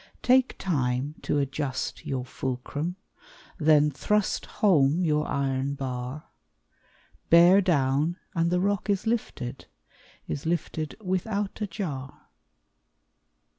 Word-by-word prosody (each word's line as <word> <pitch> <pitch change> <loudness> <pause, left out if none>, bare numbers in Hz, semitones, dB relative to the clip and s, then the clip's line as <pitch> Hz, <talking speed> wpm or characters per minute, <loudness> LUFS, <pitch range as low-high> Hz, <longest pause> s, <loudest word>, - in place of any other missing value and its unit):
Take 255 0 +4
time 135 -5 -1
to - - 0
adjust 140 -1 -3
your 130 -2 -2
fulcrum, 135 +7 -4 0.6
Then 150 -1 +5
thrust 210 +8 0
home 170 -3 +3
your 150 -1 +1
iron 135 0 -1
bar; 130 +1 -5 1.1
Bear 175 +4 +7
down 150 -1 +1 0.2
and 165 0 +1
the 180 +1 +2
rock 200 +2 0
is 200 +1 +1
lifted, 215 - -3 0.6
Is 145 - -4
lifted 160 -2 -2
without 200 +2 -2
a 210 - 0
jar. 150 -9 -6
155 Hz, 105 wpm, -27 LUFS, 135-185 Hz, 1.1 s, Bear